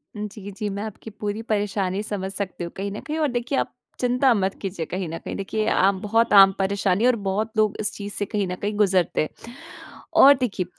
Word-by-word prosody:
जी, 210 -1 -6
जी, 210 +1 -4
मैं 200 +1 -4
आपकी 220 0 -8
पूरी 210 0 -4
परेशानी 205 -2 0
समझ 195 -3 -4
सकती 195 -3 -4
हूँ 170 - -5
कहीं 200 +1 -3
न 205 - -5
कहीं 310 +1 -2
और 305 - +2
देखिए 245 +3 -1
आप - - -2 0.3
चिंता 250 +1 +3
मत 195 -3 0
कीजिए 185 -4 -4
कहीं 185 +1 -4
न 165 - -4
कहीं - - -6
देखिए 215 +2 -2
आम 195 0 +3
बहुत 225 +2 +2
आम 195 -1 +9
परेशानी 195 +1 +1
है 250 - +6
और 250 - +3
बहुत 210 +4 -1
लोग 215 -2 +3
इस 210 - -1
चीज़ 205 0 -7
से 205 - -2
कहीं 205 -1 -1
न 180 - -3
कहीं 205 +3 -3
गुज़रते 190 -4 +2
हैं। 155 +8 -6 0.7
और 280 - +10
देखिए 205 -7 -1
205 Hz, 225 wpm, -24 LUFS, 195-215 Hz, 0.7 s, और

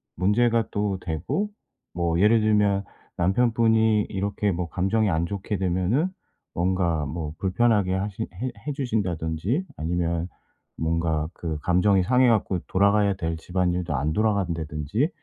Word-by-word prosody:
문제가 115 +4 +2
또 100 -2 -1
되고 90 - -2 0.4
뭐 85 -1 0
예를 110 +2 +5
들면 105 -2 +2 0.3
남편분이 110 +2 +3
이렇게 100 +1 -1
뭐 90 -1 -2
감정이 100 +4 +1
안 80 -1 +1
좋게 100 +3 -3
되면은 95 - +1 0.5
뭔가 85 -3 +1
뭐 80 0 -4
불편하게 100 -1 +2
하시 100 +3 -3
해 130 +2 -4 0.2
해 145 - -1
주신다든지 105 - -1
아니면 85 +1 -1 0.5
뭔가 80 -1 0
그 80 -4 -4
감정이 90 +2 +3
상해 125 +5 +4
갖고 105 -5 +1
돌아가야 100 +1 +3
될 80 -3 -3
집안일도 90 -1 -1
안 75 +3 0
돌아간다든지 90 - 0
95 Hz, 290 characters per minute, -25 LUFS, 85-110 Hz, 0.5 s, 예를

